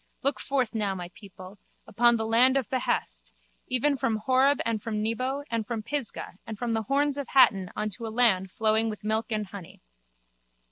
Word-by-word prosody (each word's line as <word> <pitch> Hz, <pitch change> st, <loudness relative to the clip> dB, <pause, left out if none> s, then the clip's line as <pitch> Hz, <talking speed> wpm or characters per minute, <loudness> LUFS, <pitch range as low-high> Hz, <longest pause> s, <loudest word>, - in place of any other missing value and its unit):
Look 275 Hz, +2 st, +1 dB
forth 260 Hz, -5 st, -1 dB
now, 205 Hz, -3 st, -1 dB
my 175 Hz, -1 st, -7 dB
people, 195 Hz, -1 st, -13 dB, 0.3 s
upon 240 Hz, +3 st, +4 dB
the 225 Hz, -1 st, -2 dB
land 245 Hz, +4 st, +4 dB
of 260 Hz, -6 st, -1 dB
behest, 260 Hz, -1 st, -2 dB, 0.4 s
even 270 Hz, +3 st, +1 dB
from 230 Hz, -3 st, 0 dB
Horeb 260 Hz, +6 st, +2 dB
and 225 Hz, -2 st, -1 dB
from 215 Hz, -1 st, -3 dB
Nebo 255 Hz, +5 st, -2 dB
and 230 Hz, -1 st, 0 dB
from 230 Hz, -3 st, -4 dB
Pisgah 230 Hz, -7 st, -4 dB
and 220 Hz, -1 st, -6 dB
from 235 Hz, 0 st, -2 dB
the 225 Hz, -, 0 dB
Horns 285 Hz, +5 st, 0 dB
of 280 Hz, -, -4 dB
Hatten 195 Hz, -9 st, +4 dB
unto 215 Hz, +2 st, -4 dB
a -, -, -3 dB
land 220 Hz, -5 st, +2 dB
flowing 220 Hz, +1 st, +1 dB
with 210 Hz, -1 st, -7 dB
milk 220 Hz, +1 st, 0 dB
and 215 Hz, -2 st, -1 dB
money. 190 Hz, -5 st, -10 dB
225 Hz, 185 wpm, -27 LUFS, 210-255 Hz, 0.4 s, upon